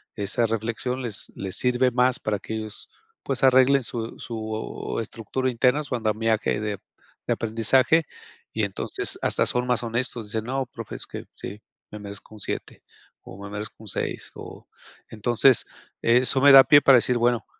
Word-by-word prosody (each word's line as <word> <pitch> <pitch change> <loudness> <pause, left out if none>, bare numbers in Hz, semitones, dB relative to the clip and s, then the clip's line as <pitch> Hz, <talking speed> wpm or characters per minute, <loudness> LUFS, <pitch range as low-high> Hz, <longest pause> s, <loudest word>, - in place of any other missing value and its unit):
esa 105 +3 0
reflexión 115 +3 -3
les 115 -5 -4
les 95 -1 -4
sirve 125 0 +2
más 125 +1 +2
para 105 -1 -2
que 110 - -7
ellos, 110 -1 -6 0.4
pues, 135 -1 -3
arreglen 130 +1 +5
su 115 -1 -5
su 110 -1 -5
estructura 115 +4 -3
interna, 125 +4 +2
su 130 -3 -3
andamiaje 110 -1 0
de 105 -1 -3 0.5
de - - +2
aprendizaje, 115 +8 +2 0.5
y 110 - -1
entonces 100 -1 -2
hasta - - +2
son 125 0 0
más 125 -1 +1
honestos, 120 -1 -2
dicen: 110 +1 -3
"No 135 +2 -2
profe, 115 -3 -9
es - - -3
que - - -8
sí, 105 +2 -8 0.3
me 105 - -8
merezco 100 +1 -9
un - - -13
7, - - -5 0.4
o 95 - -12
me 100 - -7
merezco 105 +1 -7
un 110 - -13
6", - - -4
o, - - -11 0.4
entonces 120 +3 +3 0.4
eso 125 +3 +4
me 140 - +8
da 135 - +11
pie 145 +1 +7
para 135 -2 +7
decir: 125 +1 0
"Bueno, 120 0 +1
115 Hz, 170 wpm, -24 LUFS, 110-125 Hz, 0.5 s, da